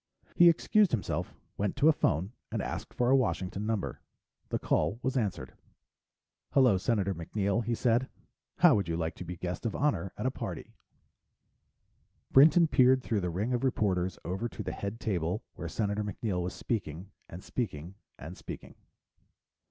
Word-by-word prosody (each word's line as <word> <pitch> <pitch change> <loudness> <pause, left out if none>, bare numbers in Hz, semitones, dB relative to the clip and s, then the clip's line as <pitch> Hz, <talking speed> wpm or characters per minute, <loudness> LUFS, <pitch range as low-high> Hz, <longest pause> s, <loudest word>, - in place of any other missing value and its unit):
He 175 0 +8
excused 205 +4 +3
himself, 115 - -2 0.2
went 100 0 -1
to 140 +3 +3
a 160 - +7
phone, 90 - 0 0.2
and - - -2
asked - - -4
for 120 +1 +1
a - - +7
Washington 105 -5 -1
number. 110 -3 -2 0.5
The - - 0
call 80 +8 0
was 130 +1 -1
answered. 110 -7 -2 1.0
"Hello, 125 -8 +5
Senator 100 -2 0
MacNeill?" 100 +6 -1
he 115 +1 -1
said. 120 +2 +1 0.5
"How - - +7
would 100 -4 +1
you 85 0 -1
like 80 0 -2
to - - -6
be 90 0 -7
guest 90 +1 -4
of 115 - -2
honor 140 -9 0
at - - -4
a 130 - +2
party?" - - -6 1.6
Brinton 160 +5 +7
peered 130 -3 +4
through 110 -4 0
the 90 - -1
ring 100 +9 -1
of 120 +1 -1
reporters 95 -8 0
over 95 +7 -2
to - - -7
the - - -3
head 100 +3 -5
table 90 -1 -1
where - - -6
Senator 105 -1 -1
MacNeill 105 -2 -2
was 90 +1 -4
speaking, 95 -4 -4 0.2
and 90 +2 -9
speaking, 90 - -4 0.2
and - - -8
speaking. - - -9
105 Hz, 165 wpm, -30 LUFS, 90-125 Hz, 1.6 s, He